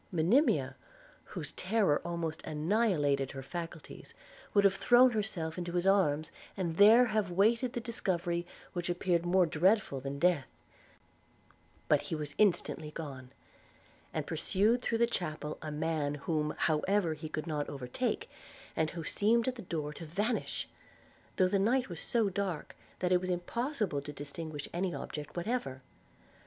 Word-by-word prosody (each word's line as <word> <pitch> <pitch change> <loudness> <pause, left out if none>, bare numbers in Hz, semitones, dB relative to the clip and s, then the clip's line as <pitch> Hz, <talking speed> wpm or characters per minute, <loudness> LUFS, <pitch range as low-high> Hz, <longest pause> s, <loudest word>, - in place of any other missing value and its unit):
Monimia, 190 - +3 0.5
whose 155 -6 -4
terror 190 -6 +1
almost 170 -2 -3
annihilated 150 - +1
her 135 -1 -6
faculties, 170 +1 -7 0.4
would 200 - +4
have 200 -1 +5
thrown 245 +5 +6
herself 185 -7 -2
into 175 -1 -4
his 175 0 0
arms, 160 -6 +3 0.3
and 170 -4 -2
there 225 +5 +8
have 215 -4 0
waited 225 +7 +2
the - - -2
discovery 175 -7 -2 0.3
which 175 -1 -3
appeared 175 -1 +1
more 185 0 +4
dreadful 175 -1 +2
than 135 +1 -5
death: 170 -3 +2 1.4
but - - +4
he - - -4
was 150 -2 -4
instantly 185 -6 +2
gone, 140 -5 -7 0.8
and - - -2
pursued 220 +6 +1
through 230 - 0
the 235 - +4
chapel 155 -8 -4
a 155 - -5
man, 150 -1 -1
whom 150 +1 -1
however 170 +2 +1
he 155 0 -7
could 155 -1 -4
not 150 -3 -2
overtake, 125 -3 -2 0.5
and 160 -1 +1
who 165 0 -6
seemed 225 - +2
at 260 - +1
the 245 - -9
door 155 -5 -4
to 165 - -9
vanish 205 +9 -2 0.3
– - - -30
though 185 - +4
the 195 +1 +1
night 245 +5 +2
was 170 -3 -5
so 230 -3 +1
dark, 190 -4 -3 0.2
that 180 0 -1
it 180 -1 +4
was 185 - -3
impossible 210 - -1
to 145 - -7
distinguish 145 +1 -6
any 175 -1 -1
object 150 +3 -7
whatever. 170 - -2
175 Hz, 155 wpm, -32 LUFS, 155-205 Hz, 1.4 s, there